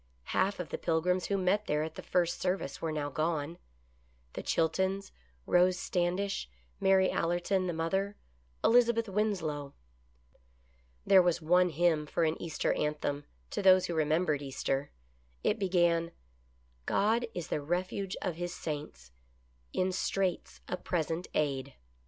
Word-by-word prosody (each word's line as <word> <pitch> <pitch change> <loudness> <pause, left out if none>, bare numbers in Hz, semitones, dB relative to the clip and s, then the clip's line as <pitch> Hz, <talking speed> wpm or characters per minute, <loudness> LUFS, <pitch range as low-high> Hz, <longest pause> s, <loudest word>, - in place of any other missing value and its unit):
Half 195 +1 +1
of 180 - -4
the - - -4
Pilgrims 180 +2 +1
who 200 - +1
met 195 +3 +1
there 150 +1 +1
at 160 - -5
the - - -8
first 175 -2 0
service 180 -7 -2
were 165 - -1
now 145 -2 -2
gone: 160 +2 -1 0.7
the - - -4
Chiltons, 190 +4 0 0.3
Rose 180 +1 +4
Standish, 180 - -1 0.3
Mary 190 -1 +4
Allerton, 175 +2 0
the - - 0
mother, 190 +5 -1 0.5
Elizabeth 235 -1 +4
Winslow. 180 -9 -1 1.3
There 190 -1 +7
was 175 -1 +2
one 180 +3 +4
hymn 160 -1 +2
for 170 - 0
an 160 0 +2
Easter 165 -3 0
anthem, 145 -1 -2 0.3
to - - -2
those 185 -1 +6
who 175 - -3
remembered 155 -1 +1
Easter. 135 0 -2 0.5
It 215 - +1
began: 175 -3 +2 0.4
" 60 0 -36
God 230 +4 +2
is 175 -2 -4
the 150 - -1
refuge 185 +5 -2
of 180 -4 -2
His 175 0 -4
saints, 105 - -6 0.6
In 185 0 0
straits 185 0 -1
a 180 - -2
present 165 0 -2
aid." 140 -2 -1
175 Hz, 140 wpm, -31 LUFS, 155-190 Hz, 1.3 s, There